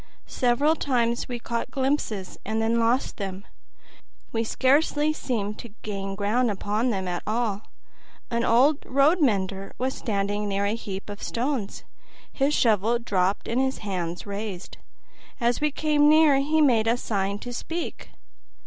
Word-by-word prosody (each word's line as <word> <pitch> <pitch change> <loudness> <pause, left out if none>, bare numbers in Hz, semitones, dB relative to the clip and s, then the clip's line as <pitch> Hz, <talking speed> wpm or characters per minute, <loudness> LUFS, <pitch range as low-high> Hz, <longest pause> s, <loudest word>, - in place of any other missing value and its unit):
Several 265 +6 +2
times 240 -5 0
we 245 -2 -4
caught 235 +1 -3
glimpses, 260 -8 -2
and 220 +2 -2
then 225 +1 +2
lost 235 +3 +1
them. 195 0 -5 0.9
We 225 0 0
scarcely 295 +5 +2
seemed 215 -8 -3
to 225 -3 -10
gain 195 -2 -4
ground 215 +5 +1
upon 210 +4 -1
them 190 -5 -2
at 175 -1 -2
all. 215 -2 -1 0.6
An 235 0 0
old 270 +7 +4
road 285 +6 +3
mender 195 -6 0
was 260 +1 -1
standing 205 -1 -2
near 200 0 0
a 205 - +1
heap 200 -4 -6
of 205 0 -8
stones, 240 -4 -2 0.5
his 280 +2 +1
shovel 225 0 +3
dropped 195 -4 0
and 240 +3 +1
his 265 0 0
hands 175 -3 -3
raised. 200 -2 -6 0.6
As 240 +1 +1
we 300 - +3
came 295 0 +3
near 310 -2 +6
he 305 +3 +2
made 235 -6 +4
a 230 +2 +3
sign 200 -4 -1
to 245 +4 -7
speak. 330 +7 -5
230 Hz, 150 wpm, -25 LUFS, 200-265 Hz, 0.9 s, near